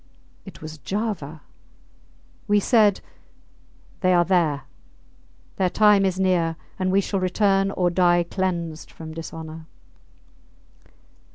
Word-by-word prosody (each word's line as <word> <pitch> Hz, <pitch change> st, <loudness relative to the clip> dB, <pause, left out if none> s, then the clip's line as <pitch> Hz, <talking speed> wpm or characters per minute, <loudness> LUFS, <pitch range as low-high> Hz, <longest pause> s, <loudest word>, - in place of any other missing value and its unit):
It -, -, -12 dB
was 155 Hz, 0 st, -8 dB
Java. 180 Hz, -, -4 dB, 1.1 s
We 205 Hz, 0 st, +4 dB
said, 210 Hz, -2 st, +3 dB, 1.0 s
They 185 Hz, -1 st, +3 dB
are 175 Hz, 0 st, +4 dB
there; 165 Hz, -7 st, +1 dB, 0.9 s
their 185 Hz, -1 st, +2 dB
time 210 Hz, 0 st, +4 dB
is 190 Hz, -1 st, -1 dB
near, 175 Hz, -3 st, +1 dB, 0.2 s
and 185 Hz, 0 st, 0 dB
we 195 Hz, +1 st, +3 dB
shall 195 Hz, 0 st, -2 dB
return 195 Hz, +1 st, +2 dB
or 180 Hz, -2 st, 0 dB
die 175 Hz, -1 st, +3 dB
cleansed 170 Hz, -3 st, -3 dB
from 160 Hz, -1 st, -10 dB
dishonour. 160 Hz, 0 st, -8 dB
180 Hz, 110 wpm, -23 LUFS, 165-195 Hz, 1.1 s, We